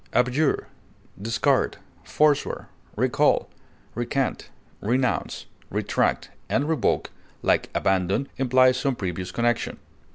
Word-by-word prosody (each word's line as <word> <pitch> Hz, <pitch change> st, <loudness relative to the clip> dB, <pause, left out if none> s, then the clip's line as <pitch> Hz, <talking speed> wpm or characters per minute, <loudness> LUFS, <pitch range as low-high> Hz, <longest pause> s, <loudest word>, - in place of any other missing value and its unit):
Abjure, 130 Hz, +5 st, +2 dB, 0.6 s
discard, 115 Hz, +2 st, +1 dB, 0.3 s
forswear, 150 Hz, -2 st, +1 dB, 0.3 s
recall, -, -, +2 dB, 0.4 s
recant, 120 Hz, +3 st, -2 dB, 0.3 s
renounce, 125 Hz, +3 st, 0 dB, 0.2 s
retract, -, -, 0 dB, 0.2 s
and 140 Hz, +2 st, +1 dB
revoke, 160 Hz, -1 st, +1 dB, 0.3 s
like -, -, +2 dB
abandon, 95 Hz, +7 st, +1 dB
imply 130 Hz, 0 st, +5 dB
some 130 Hz, +1 st, 0 dB
previous 90 Hz, -3 st, -4 dB
connection. 120 Hz, +5 st, 0 dB
125 Hz, 90 wpm, -25 LUFS, 105-135 Hz, 0.6 s, imply